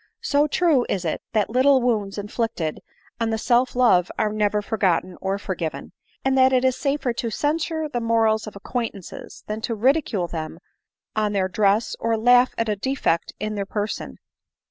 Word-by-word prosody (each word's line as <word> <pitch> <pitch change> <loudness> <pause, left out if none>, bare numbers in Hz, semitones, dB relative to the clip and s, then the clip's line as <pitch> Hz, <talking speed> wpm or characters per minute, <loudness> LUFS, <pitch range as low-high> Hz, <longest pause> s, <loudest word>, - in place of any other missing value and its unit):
So 290 +1 +2
true 305 -4 +3
is 190 -3 -1
it 160 - -2
that 215 -1 +1
little 265 +3 +5
wounds 215 -5 -1
inflicted 205 -6 -3 0.4
on 230 -1 0
the 225 - 0
self 245 +3 +2
love 230 -8 +4
are 210 -1 0
never 210 -1 +1
for 220 - -3
gotten 180 -1 +1
or 195 +1 -1
forgiven, 185 -5 -5 0.3
and 265 0 +2
that 260 0 +5
it 255 0 +2
is 260 -1 +3
safer 275 -3 -1
to 235 0 -3
censure 315 +5 -1
the 245 -5 -3
morals 225 -1 +2
of 215 - -8
acquaintances 205 -2 -6
than 215 +1 -4
to 230 0 -2
ridicule 235 - +1
them 160 -1 -5 0.6
on] 210 -1 0
their 190 -2 +1
dress, 205 +3 +1
or 230 0 0
laugh 245 +2 +4
at 230 - 0
a 210 - 0
defect 205 -7 -1
in 215 +1 -3
their 200 -2 -3
person. 210 +1 -4
220 Hz, 180 wpm, -23 LUFS, 200-255 Hz, 0.6 s, little